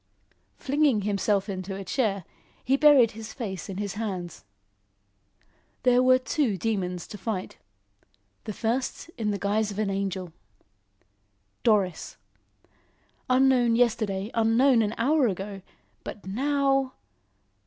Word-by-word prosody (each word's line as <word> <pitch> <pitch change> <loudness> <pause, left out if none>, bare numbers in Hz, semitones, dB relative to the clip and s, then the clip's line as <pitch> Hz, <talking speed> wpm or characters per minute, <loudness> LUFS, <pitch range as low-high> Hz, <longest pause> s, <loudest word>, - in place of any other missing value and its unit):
Flinging 280 -5 +2
himself 200 0 0
into 190 -1 -5
a 195 - -6
chair, 200 -4 0 0.4
he 265 - +3
buried 275 -6 +6
his 220 0 -9
face 195 - -6
in 190 - -5
his 200 -1 -3
hands. 190 - -5 1.4
There 250 0 +5
were 255 0 +5
two 255 -4 -1
demons 180 -4 -2
to 210 - -10
fight 190 -2 -4 0.9
the - - -3
first 245 - -2
in 220 -2 -2
the 205 - -1
guise 210 +2 0
of 200 - -7
an 210 -2 0
angel. 190 -3 -3 1.3
Doris! 200 -7 +1 1.1
Unknown 255 -2 +4
yesterday, 215 -4 0
unknown 230 +2 +4
an 215 0 -1
hour 275 +3 +3
ago; 195 0 -4 0.4
but 205 - -8
now! 270 +4 +1
220 Hz, 120 wpm, -26 LUFS, 195-255 Hz, 1.4 s, buried